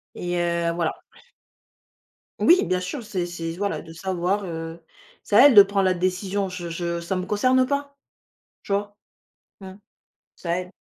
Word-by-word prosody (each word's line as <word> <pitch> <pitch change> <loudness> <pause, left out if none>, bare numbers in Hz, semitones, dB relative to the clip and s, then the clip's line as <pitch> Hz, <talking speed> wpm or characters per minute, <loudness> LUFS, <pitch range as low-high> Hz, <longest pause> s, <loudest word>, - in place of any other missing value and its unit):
Et 175 0 -3
heu, 170 -1 0
voilà. 170 -1 -2 1.4
Oui, 350 -4 +5
bien 180 +1 0
sûr, 235 +8 -5
c'est 195 -5 -3
c'est, 165 -1 -5
voilà, 200 +1 -2
de 165 - -12
savoir, 190 +3 -1
heu, 165 -1 -6 0.4
c'est 205 - 0
à 265 - +9
elle 275 - +6
de 205 - +11
prendre 195 -1 0
la 185 - +3
décision, 185 +2 -1
je 175 -2 -6
je 170 0 -3
ça 175 +3 -3
me 185 - -2
concerne 255 +6 +2
pas, 280 0 -3 0.7
tu 200 - -5
vois? 205 +1 -2 0.6
Mmh. 190 -1 -10 0.6
C'est 170 - -9
à 170 - +2
elle. 180 0 -9
185 Hz, 170 wpm, -24 LUFS, 170-205 Hz, 1.4 s, de